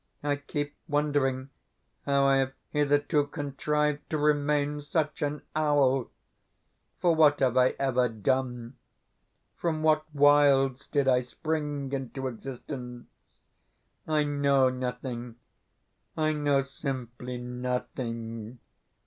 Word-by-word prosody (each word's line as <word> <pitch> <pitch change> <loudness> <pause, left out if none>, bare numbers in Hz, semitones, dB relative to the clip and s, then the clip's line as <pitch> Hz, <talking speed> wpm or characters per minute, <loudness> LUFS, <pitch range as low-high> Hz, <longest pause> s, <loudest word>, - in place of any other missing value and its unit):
I 145 -1 +1
keep 145 0 -4
wondering 140 -3 0 0.6
how 140 0 +3
I 135 0 +5
have 135 0 0 0.2
hitherto 145 0 +2
contrived 150 +1 -1
to 155 - 0
remain 145 0 +1
such 150 +1 -1
an 145 0 -2
owl. 140 -4 +2 0.9
For 175 -2 +3
what 150 -2 +5
have 130 -3 +2
I 130 0 +4
ever 125 -2 +2
done? 125 +2 -2 0.8
From 160 -2 -1
what 155 -1 +4
wilds 140 -2 +4
did 140 -2 +1
I 125 -1 +5
spring 145 +1 -3
into 135 0 -4
existence? 125 0 -7 1.0
I 155 -1 +2
KNOW 140 -2 +3
nothing 125 -2 -5 0.8
I 155 0 +2
know 145 -2 +2
simply 125 -3 -5
NOTHING. 125 -2 -4
140 Hz, 105 wpm, -28 LUFS, 125-145 Hz, 1.0 s, I